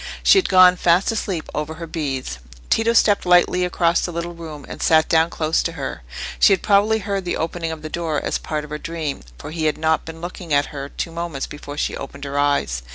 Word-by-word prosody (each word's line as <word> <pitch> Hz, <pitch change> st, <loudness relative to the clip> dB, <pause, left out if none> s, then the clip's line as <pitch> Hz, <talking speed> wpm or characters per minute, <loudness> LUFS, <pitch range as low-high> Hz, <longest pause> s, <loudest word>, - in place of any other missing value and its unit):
She 395 Hz, -, +7 dB
had -, -, -2 dB
gone 185 Hz, -1 st, +7 dB
fast 175 Hz, +4 st, +3 dB
asleep 195 Hz, -6 st, -3 dB
over 150 Hz, +1 st, -3 dB
her 165 Hz, +1 st, -7 dB
beads. 135 Hz, -, -4 dB, 0.3 s
Tito 225 Hz, +1 st, +3 dB
stepped 210 Hz, -3 st, +4 dB
lightly 180 Hz, 0 st, +4 dB
across 175 Hz, -1 st, +1 dB
the 175 Hz, -, -3 dB
little 170 Hz, +1 st, -4 dB
room, 160 Hz, -4 st, -9 dB
and -, -, -8 dB
sat 160 Hz, -1 st, +4 dB
down 160 Hz, 0 st, +3 dB
close 160 Hz, -1 st, 0 dB
to 165 Hz, -, -3 dB
her. 140 Hz, -, -5 dB, 0.4 s
She -, -, +6 dB
had 190 Hz, -, -1 dB
probably 210 Hz, +2 st, +4 dB
heard 200 Hz, -2 st, -3 dB
the 175 Hz, -, -2 dB
opening 165 Hz, 0 st, -3 dB
of 160 Hz, -1 st, -7 dB
the -, -, -4 dB
door 160 Hz, -2 st, -2 dB
as -, -, -2 dB
part 150 Hz, -1 st, -3 dB
of 150 Hz, -, -11 dB
her 150 Hz, -, -4 dB
dream, 160 Hz, -4 st, -4 dB, 0.2 s
for 150 Hz, -, -8 dB
he 160 Hz, -1 st, -2 dB
had 155 Hz, -, +1 dB
not 160 Hz, 0 st, +1 dB
been 160 Hz, 0 st, -9 dB
looking 175 Hz, -2 st, -3 dB
at 145 Hz, +1 st, 0 dB
her 140 Hz, -1 st, -6 dB
two 165 Hz, -, -5 dB
moments 165 Hz, -4 st, -4 dB
before 145 Hz, 0 st, -9 dB
she -, -, -1 dB
opened 140 Hz, 0 st, -8 dB
her 140 Hz, 0 st, -2 dB
eyes. 140 Hz, -, +1 dB
165 Hz, 230 wpm, -21 LUFS, 150-180 Hz, 0.4 s, She